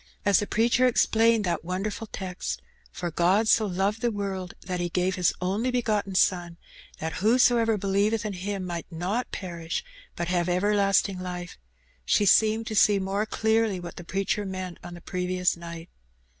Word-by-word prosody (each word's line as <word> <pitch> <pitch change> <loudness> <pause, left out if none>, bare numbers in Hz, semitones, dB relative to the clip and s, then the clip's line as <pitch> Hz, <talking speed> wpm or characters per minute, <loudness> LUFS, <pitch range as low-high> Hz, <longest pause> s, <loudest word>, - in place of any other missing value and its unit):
As 200 -2 +5
the 205 - -2
preacher 235 +3 +3
explained 230 -2 +3
that 175 - -1
wonderfiil 195 +5 -3
text, 185 -2 -4 0.3
"For 175 -1 -4
God 185 +7 +2
so 215 -1 +4
loved 195 +4 -1
the 240 - +2
world, 195 -4 -4
that 180 -1 -4
He 175 0 -1
gave 180 +2 0
His 180 -2 +2
only 200 +7 -1
begotten 215 -6 -1
Son, 175 -2 +1 0.4
that 160 0 -4
whosoever 230 0 +4
believeth 205 +3 +1
in 210 - -2
Him 190 +1 -4
might 175 -1 -5
not 185 +9 -2
perish, 170 - -4 0.3
but 175 - -3
have 175 0 0
everlasting 195 0 +2
Ufe,'' 180 -1 -6 0.5
she 205 - +2
seemed 220 +3 +4
to 220 - -4
see 205 0 +5
more 195 +2 -1
clearly 220 -3 +1
what 175 -1 -8
the 175 - -7
preacher 195 +3 -1
meant 185 -2 -5
on 175 - -8
the 175 - -11
previous 180 0 -1
night. 170 0 -8
195 Hz, 170 wpm, -26 LUFS, 180-215 Hz, 0.5 s, As